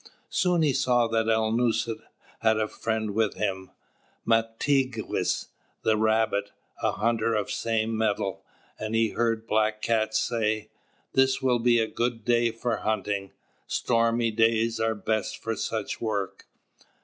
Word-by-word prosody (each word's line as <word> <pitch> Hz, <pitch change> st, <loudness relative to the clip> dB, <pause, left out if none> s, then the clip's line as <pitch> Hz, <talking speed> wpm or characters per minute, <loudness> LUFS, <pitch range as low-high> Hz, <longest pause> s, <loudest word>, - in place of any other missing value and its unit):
Soon 180 Hz, -3 st, +2 dB
he 145 Hz, -3 st, +3 dB
saw 125 Hz, -3 st, +3 dB
that 115 Hz, 0 st, +1 dB
Alnūset 115 Hz, +1 st, +1 dB, 0.4 s
had 110 Hz, -1 st, +3 dB
a 110 Hz, -, +1 dB
friend 110 Hz, -1 st, -2 dB
with 110 Hz, 0 st, 0 dB
him, 95 Hz, -3 st, -2 dB, 0.6 s
"Mātigwess," 115 Hz, +2 st, 0 dB, 0.3 s
the 110 Hz, -, +3 dB
Rabbit, 110 Hz, -2 st, +1 dB, 0.3 s
a -, -, +1 dB
hunter 115 Hz, 0 st, +1 dB
of 105 Hz, -2 st, 0 dB
the -, -, -7 dB
same 115 Hz, -1 st, 0 dB
metal; 100 Hz, -3 st, -1 dB, 0.4 s
and 110 Hz, +1 st, -3 dB
he 115 Hz, 0 st, +3 dB
heard 115 Hz, 0 st, 0 dB
Black 110 Hz, -1 st, +1 dB
Cat 110 Hz, -1 st, 0 dB
say: 110 Hz, -1 st, 0 dB, 0.4 s
"This 130 Hz, 0 st, +3 dB
will 125 Hz, -2 st, +3 dB
be 120 Hz, 0 st, +4 dB
a 115 Hz, -, +3 dB
good 115 Hz, -1 st, -2 dB
day 120 Hz, -1 st, +3 dB
for 115 Hz, 0 st, -2 dB
hunting. 100 Hz, -2 st, -2 dB, 0.3 s
Stormy 115 Hz, 0 st, +1 dB
days 115 Hz, +1 st, +2 dB
are 110 Hz, 0 st, +1 dB
best 110 Hz, 0 st, -2 dB
for 115 Hz, 0 st, -3 dB
such 110 Hz, 0 st, -3 dB
work." 105 Hz, -4 st, -3 dB
110 Hz, 140 wpm, -27 LUFS, 110-115 Hz, 0.6 s, be